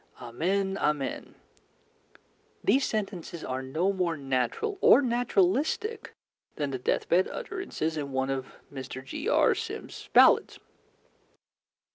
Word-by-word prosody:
Amen, 190 Hz, +11 st, -1 dB
Amen," 150 Hz, -3 st, -2 dB, 1.3 s
these 270 Hz, 0 st, +3 dB
sentences 190 Hz, -6 st, -4 dB
are 130 Hz, +1 st, -3 dB
no 160 Hz, +9 st, 0 dB
more 175 Hz, -4 st, -1 dB
natural 135 Hz, -, -1 dB
or -, -, +7 dB
naturalistic 245 Hz, -, 0 dB, 0.4 s
than 145 Hz, -2 st, -2 dB
the 130 Hz, -, -3 dB
death -, -, -1 dB
bed 180 Hz, +2 st, +3 dB
utterances 380 Hz, -, -4 dB
in 140 Hz, -2 st, -4 dB
one 130 Hz, 0 st, -1 dB
of 135 Hz, -1 st, -3 dB, 0.3 s
Mr. 130 Hz, -1 st, -7 dB
G.R. -, -, +2 dB
Sims's -, -, -7 dB
ballads. -, -, +5 dB
170 Hz, 110 wpm, -28 LUFS, 135-215 Hz, 1.3 s, or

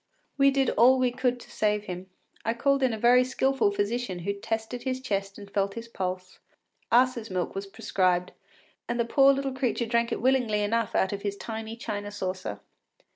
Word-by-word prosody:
We 275 Hz, -1 st, +5 dB
did 270 Hz, -1 st, +2 dB
all 250 Hz, +4 st, +5 dB
we 255 Hz, -1 st, +2 dB
could 250 Hz, 0 st, 0 dB
to -, -, -14 dB
save 210 Hz, -1 st, 0 dB
him; 185 Hz, -1 st, -7 dB, 0.3 s
I 225 Hz, +1 st, 0 dB
called 275 Hz, +3 st, +2 dB
in 260 Hz, -2 st, +3 dB
a 220 Hz, -, -3 dB
very 245 Hz, +3 st, +5 dB
skilful 265 Hz, -2 st, +1 dB
physician 205 Hz, 0 st, -2 dB
who 200 Hz, -, 0 dB
tested 225 Hz, +4 st, -4 dB
his 260 Hz, 0 st, -2 dB
chest 195 Hz, -6 st, -3 dB
and 205 Hz, -1 st, -10 dB
felt 195 Hz, 0 st, 0 dB
his 230 Hz, 0 st, -6 dB
pulse. 185 Hz, -4 st, -5 dB, 0.5 s
Ass’s 245 Hz, -2 st, +3 dB
milk 185 Hz, -2 st, -2 dB
was 195 Hz, +1 st, -5 dB
prescribed, 185 Hz, -2 st, 0 dB, 0.6 s
and 240 Hz, 0 st, -1 dB
the 235 Hz, -, +2 dB
poor 275 Hz, +3 st, +5 dB
little 275 Hz, -1 st, -1 dB
creature 255 Hz, -2 st, -1 dB
drank 235 Hz, 0 st, +1 dB
it -, -, -1 dB
willingly 245 Hz, -5 st, +2 dB
enough 230 Hz, +3 st, 0 dB
out 190 Hz, -, +2 dB
of 200 Hz, -, -4 dB
his 200 Hz, -1 st, -3 dB
tiny 220 Hz, +1 st, -6 dB
china 205 Hz, -3 st, -5 dB
saucer. 190 Hz, -2 st, -4 dB
225 Hz, 190 wpm, -27 LUFS, 200-250 Hz, 0.6 s, We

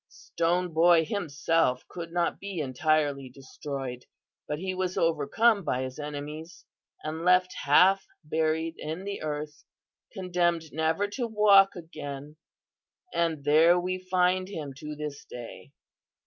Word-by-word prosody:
Stone 175 Hz, +1 st, -1 dB
Boy 165 Hz, 0 st, +5 dB
himself 155 Hz, -7 st, 0 dB
could 165 Hz, -2 st, -7 dB
not 175 Hz, -1 st, 0 dB
be 200 Hz, -2 st, -6 dB
entirely 145 Hz, 0 st, 0 dB
destroyed, 135 Hz, -1 st, -7 dB, 0.4 s
but 150 Hz, -, -2 dB
he 185 Hz, +3 st, -3 dB
was 185 Hz, -1 st, -2 dB
overcome 185 Hz, +7 st, +2 dB
by 130 Hz, -4 st, -1 dB
his 130 Hz, +2 st, -7 dB
enemies 150 Hz, +3 st, -7 dB, 0.4 s
and 160 Hz, +2 st, -4 dB
left 180 Hz, +1 st, +4 dB
half 190 Hz, +7 st, +5 dB, 0.2 s
buried 160 Hz, +1 st, 0 dB
in 160 Hz, +5 st, -5 dB
the 200 Hz, 0 st, -5 dB
earth, 150 Hz, -1 st, -5 dB, 0.5 s
condemned 175 Hz, -4 st, -1 dB
never 160 Hz, +6 st, +1 dB
to 240 Hz, +3 st, -3 dB
walk 205 Hz, -3 st, +5 dB
again, 150 Hz, -4 st, -8 dB, 0.8 s
and 165 Hz, -4 st, 0 dB
there 160 Hz, +4 st, +5 dB
we 185 Hz, +1 st, -2 dB
find 185 Hz, 0 st, +1 dB
him 150 Hz, -8 st, -6 dB
to 150 Hz, +1 st, -7 dB
this 150 Hz, -1 st, -6 dB
day. 120 Hz, -1 st, -10 dB
160 Hz, 130 wpm, -28 LUFS, 150-180 Hz, 0.8 s, Boy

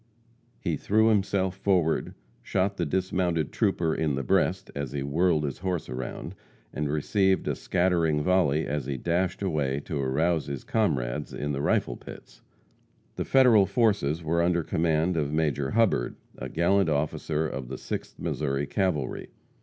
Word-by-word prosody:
He 80 Hz, -3 st, -1 dB
threw 110 Hz, +7 st, +3 dB
himself 95 Hz, -3 st, +1 dB
forward, 90 Hz, -5 st, +1 dB, 0.3 s
shot 100 Hz, +1 st, -1 dB
the 85 Hz, -, -1 dB
dismounted 90 Hz, -3 st, 0 dB
trooper 80 Hz, -2 st, +1 dB
in 75 Hz, -3 st, 0 dB
the 70 Hz, -, -2 dB
breast -, -, +1 dB
as 70 Hz, -3 st, -4 dB
he 70 Hz, -1 st, -2 dB
whirled 80 Hz, +2 st, +2 dB
his 70 Hz, -3 st, -3 dB
horse 90 Hz, -3 st, -2 dB
around, 65 Hz, 0 st, -5 dB, 0.4 s
and 75 Hz, -1 st, -2 dB
received 95 Hz, +6 st, +1 dB
a -, -, +1 dB
scattering 85 Hz, -4 st, +1 dB
volley 80 Hz, -4 st, +2 dB
as 70 Hz, -3 st, -3 dB
he 70 Hz, -2 st, -2 dB
dashed 85 Hz, +7 st, -1 dB
away 75 Hz, -7 st, 0 dB
to 75 Hz, -2 st, -3 dB
arouse 80 Hz, +4 st, +1 dB
his 70 Hz, -2 st, -5 dB
comrades 65 Hz, -, -1 dB
in 75 Hz, 0 st, -3 dB
the 70 Hz, 0 st, -2 dB
rifle -, -, +1 dB
pits. -, -, -12 dB, 0.7 s
The -, -, -3 dB
Federal 120 Hz, -7 st, +5 dB
forces 100 Hz, -, +1 dB
were 85 Hz, +2 st, +1 dB
under 85 Hz, 0 st, +2 dB
command 80 Hz, +1 st, +1 dB
of 75 Hz, -2 st, 0 dB
Major 75 Hz, -3 st, 0 dB
Hubbard, 110 Hz, -, +1 dB, 0.2 s
a -, -, -6 dB
gallant 90 Hz, +2 st, +2 dB
officer 75 Hz, +1 st, -1 dB
of 65 Hz, -4 st, -5 dB
the 65 Hz, +1 st, -6 dB
Sixth -, -, -6 dB
Missouri 70 Hz, -1 st, -2 dB
Cavalry. 85 Hz, -8 st, -1 dB
80 Hz, 155 wpm, -27 LUFS, 70-95 Hz, 0.7 s, Federal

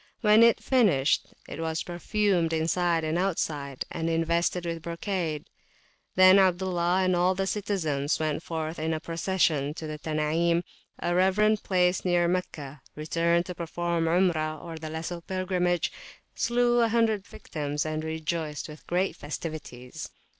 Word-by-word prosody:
When 225 Hz, +1 st, +7 dB
finished, 195 Hz, -, +2 dB, 0.2 s
it -, -, -7 dB
was 160 Hz, -1 st, -2 dB
perfumed 175 Hz, -1 st, 0 dB
inside 165 Hz, +1 st, +1 dB
and 160 Hz, +2 st, 0 dB
outside, 150 Hz, -7 st, -2 dB
and 165 Hz, 0 st, -2 dB
invested 170 Hz, +2 st, 0 dB
with 165 Hz, -1 st, -3 dB
brocade. 170 Hz, -2 st, -3 dB, 0.7 s
Then 185 Hz, +1 st, +8 dB
Abdullah 185 Hz, -1 st, +2 dB
and 185 Hz, -1 st, +2 dB
all 180 Hz, +2 st, +2 dB
the 195 Hz, +1 st, -1 dB
citizens 165 Hz, -9 st, -1 dB
went 155 Hz, -1 st, -1 dB
forth 160 Hz, -1 st, -4 dB
in 160 Hz, +1 st, -1 dB
a -, -, -3 dB
procession 165 Hz, -3 st, 0 dB
to 160 Hz, -, -6 dB
the 155 Hz, -1 st, -6 dB
Tanim, 160 Hz, +3 st, +1 dB, 0.3 s
a 175 Hz, -, -1 dB
reverend 205 Hz, +4 st, +3 dB
place 180 Hz, -1 st, +1 dB
near 175 Hz, -1 st, +2 dB
Meccah, 150 Hz, -6 st, -3 dB
returned 170 Hz, +3 st, +1 dB
to 180 Hz, -, -5 dB
perform 170 Hz, 0 st, -2 dB
Umrah, 165 Hz, -2 st, 0 dB
the 155 Hz, 0 st, -6 dB
Lesser 165 Hz, +2 st, -5 dB
Pilgrimage, 180 Hz, -2 st, 0 dB, 0.4 s
slew 240 Hz, 0 st, +2 dB
100 225 Hz, -3 st, +2 dB
victims, 150 Hz, -1 st, -4 dB
and 155 Hz, 0 st, -2 dB
rejoiced 160 Hz, -2 st, -3 dB
with 150 Hz, -1 st, -12 dB
great 180 Hz, +2 st, 0 dB
festivities. 145 Hz, -5 st, -7 dB
170 Hz, 135 wpm, -27 LUFS, 155-185 Hz, 0.7 s, Then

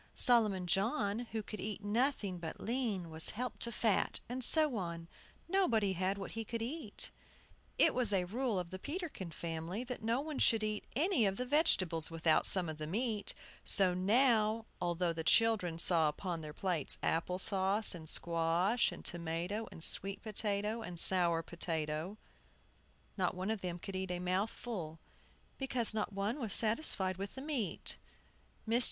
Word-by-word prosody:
Solomon 215 Hz, -7 st, +4 dB
John, 205 Hz, -, 0 dB
who 220 Hz, -1 st, -3 dB
could 215 Hz, -, -7 dB
eat 210 Hz, -1 st, -5 dB
nothing 210 Hz, -4 st, 0 dB
but 165 Hz, -1 st, -7 dB
lean, 220 Hz, -8 st, -2 dB
was 160 Hz, 0 st, 0 dB
helped 250 Hz, +3 st, -5 dB
to 235 Hz, -, -1 dB
fat, 220 Hz, -3 st, +1 dB
and 255 Hz, +2 st, -2 dB
so 305 Hz, 0 st, +5 dB
on. 170 Hz, -3 st, -5 dB, 0.4 s
Nobody 235 Hz, -, +2 dB
had 190 Hz, +2 st, -1 dB
what 195 Hz, -, -6 dB
he 225 Hz, -, -4 dB
could 230 Hz, +1 st, -4 dB
eat. 260 Hz, -3 st, -2 dB, 0.7 s
It -, -, +5 dB
was 245 Hz, -4 st, +1 dB
a 190 Hz, -3 st, +2 dB
rule 230 Hz, +2 st, -1 dB
of 180 Hz, -1 st, -4 dB
the 185 Hz, -, -6 dB
Peterkin 295 Hz, -, -5 dB
family, 165 Hz, +6 st, -5 dB
that 250 Hz, -1 st, -6 dB
no 230 Hz, +3 st, 0 dB
one 300 Hz, 0 st, -5 dB
should 225 Hz, -2 st, +3 dB
eat 215 Hz, -1 st, -3 dB
any 305 Hz, -, +2 dB
of 195 Hz, 0 st, -2 dB
the 250 Hz, -, -2 dB
vegetables 190 Hz, -, +2 dB
without 165 Hz, -1 st, +2 dB
some 185 Hz, -3 st, +4 dB
of 155 Hz, -1 st, -6 dB
the 155 Hz, -, -4 dB
meat; 215 Hz, +3 st, -1 dB, 0.3 s
so 185 Hz, -2 st, +5 dB
now, 220 Hz, +3 st, +2 dB, 0.2 s
although 175 Hz, 0 st, 0 dB
the 160 Hz, 0 st, -4 dB
children 200 Hz, -4 st, +2 dB
saw 165 Hz, -2 st, +4 dB
upon 170 Hz, +2 st, -4 dB
their 155 Hz, -1 st, -7 dB
plates 170 Hz, -2 st, -2 dB
apple 170 Hz, +2 st, 0 dB
sauce 195 Hz, +3 st, +2 dB
and 160 Hz, -3 st, -9 dB
squash 170 Hz, +7 st, +1 dB
and -, -, -10 dB
tomato 175 Hz, +6 st, -3 dB
and 160 Hz, -, -6 dB
sweet 195 Hz, +3 st, +1 dB
potato 210 Hz, 0 st, -2 dB
and 180 Hz, -6 st, -5 dB
sour 170 Hz, -3 st, +6 dB
potato, 165 Hz, +2 st, -4 dB, 1.0 s
not 180 Hz, -2 st, 0 dB
one 185 Hz, +4 st, -2 dB
of 220 Hz, -3 st, -3 dB
them 175 Hz, -1 st, -4 dB
could 190 Hz, +2 st, -7 dB
eat 190 Hz, 0 st, -3 dB
a 180 Hz, -, -2 dB
mouthful, 185 Hz, -1 st, -3 dB, 0.6 s
because 255 Hz, -4 st, +2 dB
not 215 Hz, -1 st, -2 dB
one 205 Hz, +7 st, -2 dB
was 225 Hz, -6 st, +1 dB
satisfied 215 Hz, -, +3 dB
with 195 Hz, +1 st, -6 dB
the 265 Hz, -, -6 dB
meat. 265 Hz, -, -3 dB, 0.7 s
Mr. 230 Hz, +2 st, +3 dB
200 Hz, 170 wpm, -34 LUFS, 175-230 Hz, 1.0 s, sour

